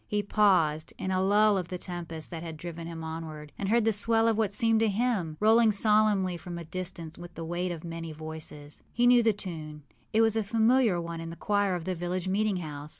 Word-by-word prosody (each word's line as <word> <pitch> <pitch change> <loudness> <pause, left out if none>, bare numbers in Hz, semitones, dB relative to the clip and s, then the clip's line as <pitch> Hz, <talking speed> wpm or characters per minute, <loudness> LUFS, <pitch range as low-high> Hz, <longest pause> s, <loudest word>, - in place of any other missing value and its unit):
He 210 0 -1
paused, 180 -7 +2
in 190 - -3
a 185 0 +1
lull 205 +1 +4
of 180 - -5
the 180 - -5
tempest 170 -3 -6
that 165 -2 -5
had 165 -2 -7
driven 165 0 -7
him 165 -1 -7
onward, 160 -2 -7
and 195 - -3
heard 230 0 +3
the 225 - +4
swell 225 +2 +2
of 225 - +3
what 215 -2 0
seemed 225 +1 +3
a 225 - +4
hymn, 200 -7 -1
rolling 220 +1 +5
solemnly 210 -3 +2
from 175 +1 -7
a 170 - -7
distance 170 -2 -6
with 175 0 -10
the 165 - -6
weight 175 +2 -2
of 165 -2 -6
many 165 -1 -6
voices. 155 -1 -7
He 245 - +1
knew 245 0 +6
the 225 -1 +4
tune; 155 -7 -7 0.3
it 220 - +3
was 225 -1 +3
a 220 - +1
familiar 225 -1 +3
one 170 -1 -5
in 165 - -6
the 165 - -7
choir 205 0 0
of 170 -2 -5
the 185 - -1
village 175 +1 -3
meeting 205 +1 +1
house. 150 -3 -7
185 Hz, 230 wpm, -28 LUFS, 165-215 Hz, 0.3 s, knew